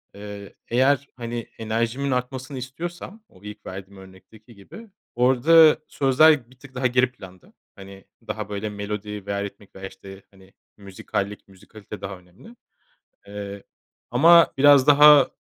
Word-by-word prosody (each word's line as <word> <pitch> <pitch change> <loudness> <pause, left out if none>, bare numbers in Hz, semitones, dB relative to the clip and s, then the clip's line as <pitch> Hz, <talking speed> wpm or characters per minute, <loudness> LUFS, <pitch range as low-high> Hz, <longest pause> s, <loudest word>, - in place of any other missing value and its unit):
eee, 100 -1 -10
eğer, 135 +3 +1
hani, 120 -1 -6
enerjimin 115 +5 -2
artmasını 130 +2 -4
istiyorsam 175 - -8
o 95 - -22
ilk 105 0 -11
verdiğim 95 +1 -10
örnekteki 100 +4 -17
gibi 220 - -14 0.3
orada 145 +6 +5
sözler 135 -1 +3
bir 130 - -22
tık 135 -1 -16
daha 130 0 0
geri 125 +1 +1
planda. 95 -7 -16 0.2
Hani, 95 0 -14 0.2
daha 105 -1 -5
böyle 105 +1 -4
melodi 105 0 -6
veya 100 0 -3
ritmik 100 0 -11
veya 95 0 -8
işte, 95 0 -14
hani, 95 0 -21 0.2
müzikallik, 100 +1 -6
müzikalite 100 +2 -13
daha 95 -1 -7
önemli. 90 - -18 0.7
Eee, 100 -1 -8 0.5
ama 165 +7 +5
biraz 145 -1 +5
daha 145 -1 +7
110 Hz, 135 wpm, -23 LUFS, 100-135 Hz, 0.7 s, daha